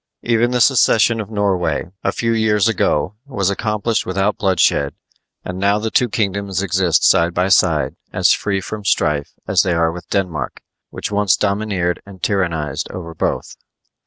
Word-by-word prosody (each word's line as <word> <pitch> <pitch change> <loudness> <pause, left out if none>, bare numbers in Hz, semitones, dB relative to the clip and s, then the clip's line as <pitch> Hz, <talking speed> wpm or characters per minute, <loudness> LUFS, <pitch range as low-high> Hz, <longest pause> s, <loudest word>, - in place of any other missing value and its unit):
Even 120 0 +2
the 125 0 0
secession 115 -3 +4
of 105 - -8
Norway, 90 -6 -1
a - - +1
few 115 -1 -1
years 110 -1 +2
ago, 90 -5 0
was 100 -8 -1
accomplished 110 +2 -1
without 95 +3 0
bloodshed, 90 -7 +1 0.5
and 90 +1 -5
now 100 +1 +2
the 110 +1 -3
two 125 - +2
kingdoms 100 -2 -1
exist 90 -3 +1
side 85 0 +3
by 90 +2 +1
side 80 -8 +2 0.2
as - - +3
free 100 -2 0
from 105 +2 -6
strife 75 -6 0
as - - +3
they 90 - 0
are 85 -1 +2
with 85 -1 -10
Denmark, 85 -9 -3 0.3
which - - -5
once 100 -2 +2
domineered 100 -4 -1
and 100 -1 -13
tyrannized 80 -7 -1
over 85 -2 -7
both. - - -3
95 Hz, 160 wpm, -18 LUFS, 85-105 Hz, 0.5 s, secession